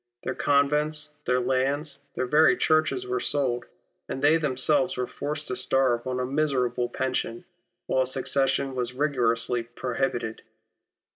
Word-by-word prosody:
Their 130 - -2
convents, 150 +2 +1
their 125 0 +2
land, 135 +4 0 0.2
their 130 - -1
very 150 +5 +5
churches 155 - +2
were 390 +1 -1
sold, 125 - 0 0.4
and - - -3
they 150 +4 +5
themselves 150 +3 +1
were 125 - 0
forced 150 +3 -5
to 125 - -1
starve 130 -1 +1
on 130 0 -2
a 125 - 0
miserable 130 -4 0
pension, 130 -3 -2 0.4
while 130 - +1
a 130 - +1
succession 135 +1 0
was 125 -1 -2
rigorously 125 -4 +1
prohibited. 120 -1 -3
130 Hz, 140 wpm, -26 LUFS, 125-150 Hz, 0.4 s, very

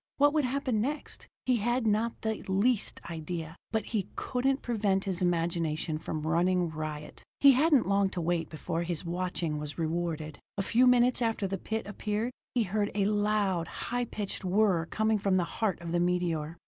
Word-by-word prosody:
What 290 +1 +5
would 305 -3 +2
happen 255 -4 0
next, 290 +6 -4 0.2
he 255 -1 +3
had 240 +3 0
not 220 +2 +1
the 220 -1 -1
least 200 +4 +1
idea, 165 0 -5 0.2
but 220 -2 0
he 210 -5 -2
couldn't 265 +2 0
prevent 205 -5 +1
his 190 -2 -2
imagination 165 -3 0
from 155 -1 -4
running 175 +2 +2
riot. 155 -1 -6 0.2
He 280 - +8
hadn't 280 - +4
long 200 0 +3
to - - +1
wait 165 -1 0
before 165 +1 -3
his 170 -1 -2
watching 170 -3 -2
was 150 -1 -6
rewarded. 160 -2 -2 0.2
A 195 - 0
few 245 +5 +4
minutes 250 0 +4
after 225 -3 0
the 195 0 -2
pit 220 +2 -3
appeared, 210 +3 -2 0.2
he 240 - +3
heard 205 +1 0
a 200 -1 +2
loud, 205 -4 +1
high 245 +6 -3
pitched 210 -4 -4
whir 185 -3 +2
coming 220 +2 +1
from 195 -1 +2
the 180 - +2
heart 195 +2 -1
of 170 -1 -5
the 175 - +2
meteor. 175 -3 0
195 Hz, 180 wpm, -30 LUFS, 170-225 Hz, 0.2 s, He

